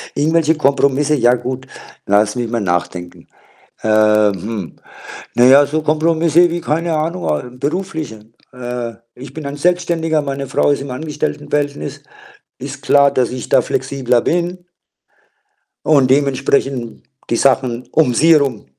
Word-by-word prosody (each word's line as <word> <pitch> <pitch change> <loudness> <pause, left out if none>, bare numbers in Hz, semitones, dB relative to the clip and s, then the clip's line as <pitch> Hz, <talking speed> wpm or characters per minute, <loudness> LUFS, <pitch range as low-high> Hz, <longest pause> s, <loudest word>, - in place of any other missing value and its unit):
irgendwelche 160 +1 +2
Kompromisse, 140 0 +2
ja 120 -2 +3
gut, 130 +2 -5 0.4
lass 105 +2 +2
mich 120 -2 -2
mal 115 -2 -2
nachdenken. 90 -1 -3 0.6
Äh, 110 - -2 0.4
hm. 100 -2 -6 0.6
Na 120 - +4
ja, 140 +2 +7
so 155 +2 -2
Kompromisse 165 +2 +2
wie 170 +1 -3
keine 165 +2 -1
Ahnung, 155 - -2
äh, 75 +11 -2
berufliche. 150 - -4 0.3
Äh, 120 -2 -5 0.2
ich 130 +1 -11
bin 155 -1 -7
ein 140 +1 -5
Selbstständiger, 165 -1 0
meine 140 -1 -4
Frau - - +1
ist 145 - 0
im 140 - -8
Angestelltenverhältnis. 145 0 -3 0.6
Ist - - -8
klar, 140 -1 +4
dass 125 -3 0
ich 125 -2 -6
da - - +4
flexibler 125 -3 0
bin 175 +1 -2 1.2
und 140 -4 +3
dementsprechend 135 -3 0 0.3
die 120 - +2
Sachen 130 -2 +1
um 150 -6 +3
sie 165 +5 +4
herum. 135 - 0
140 Hz, 135 wpm, -17 LUFS, 120-155 Hz, 1.2 s, ja